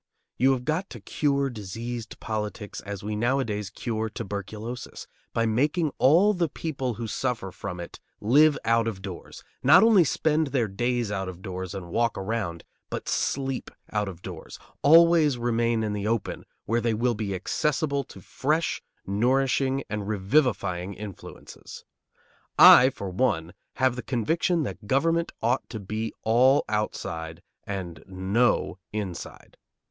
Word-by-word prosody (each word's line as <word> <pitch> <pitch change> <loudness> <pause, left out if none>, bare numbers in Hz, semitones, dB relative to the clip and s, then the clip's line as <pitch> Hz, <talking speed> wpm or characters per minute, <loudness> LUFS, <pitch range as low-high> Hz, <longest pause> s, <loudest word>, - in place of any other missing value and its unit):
You 135 +2 +5
have 125 -1 -4
got 165 +6 -1
to - - -9
cure 140 -2 0
diseased 115 +2 -6
politics 105 -1 -4
as 100 -1 -7
we 105 +1 -3
nowadays 110 -3 0
cure 110 +2 -3
tuberculosis, 105 +4 -6 0.3
by 115 - +1
making 145 +8 +1
all 175 +11 +5
the 175 -4 0
people 135 -6 -3
who 115 - -5
suffer 115 -3 -2
from 90 -1 -6
it 85 - -8 0.2
live 145 +7 +5
out 115 0 +3
of 95 -4 -4
doors; 95 -3 -8 0.2
not 160 +9 +7
only 220 -5 +6
spend 155 +1 +1
their 130 -4 0
days 120 +2 -1
out 95 -2 -2
of 90 0 -10
doors 95 0 -5
and 90 -3 -7
walk 115 +2 +1
around, 95 -4 -3 0.3
but - - -5
sleep 135 -1 -1 0.2
out 105 -1 0
of 90 -2 -8
doors; 90 -4 -8 0.2
always 160 -2 +6
remain 115 -1 +1
in 105 -1 -1
the 105 0 -2
open, 115 -2 -2 0.2
where 115 +2 +1
they 115 -1 +1
will 120 +2 +1
be 105 -3 -3
accessible 140 - 0
to 95 - -13
fresh, 155 - -1 0.2
nourishing, 130 +5 +1
and 105 -2 -4
revivifying 100 -4 0
influences. 100 -2 -10 0.7
I, 130 - +10
for 100 -8 -6
one, 90 -6 0 0.2
have 130 -2 +2
the 125 - -4
conviction 160 - 0
that 100 -4 -6
government 165 +7 +1
ought 120 +3 0
to 110 - -6
be 110 +3 -4
all 125 +5 +4
outside 80 -6 -3 0.2
and 95 -4 -5
no 95 +2 +1
inside. 100 -5 -6
115 Hz, 145 wpm, -26 LUFS, 100-135 Hz, 0.7 s, I